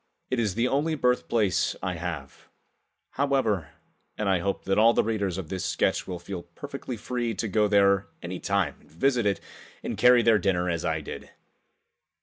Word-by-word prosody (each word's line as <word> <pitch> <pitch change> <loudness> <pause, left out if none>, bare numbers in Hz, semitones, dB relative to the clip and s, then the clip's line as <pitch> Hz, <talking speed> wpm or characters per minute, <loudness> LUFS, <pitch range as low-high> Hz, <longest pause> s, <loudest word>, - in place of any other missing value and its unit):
It 130 - +1
is 105 -5 0
the 115 +2 +2
only 150 +5 +1
birthplace 120 -6 +1
I 90 0 -1
have, 80 -5 -6 0.6
however, 130 - +1 0.5
and 105 - -1
I 95 -2 +3
hope 100 +2 -2
that 95 +2 +2
all 115 +2 +6
the - - +4
readers 100 -5 -1
of 90 -5 -6
this 95 -1 -3
sketch 85 - 0
will 90 -2 -4
feel 90 +1 -6
perfectly 125 +8 -7
free 120 0 -2
to 110 - -2
go 105 +1 +2
there 100 -1 +4 0.2
any 90 +1 -5
time 100 -7 0
and - - -23
visit 120 - +1
it 100 - +1 0.4
and - - -3
carry 125 -1 +6
their 110 -2 +5
dinner 90 -3 +1
as 85 0 -2
I 80 -2 0
did. - - -8
100 Hz, 180 wpm, -27 LUFS, 90-115 Hz, 0.6 s, all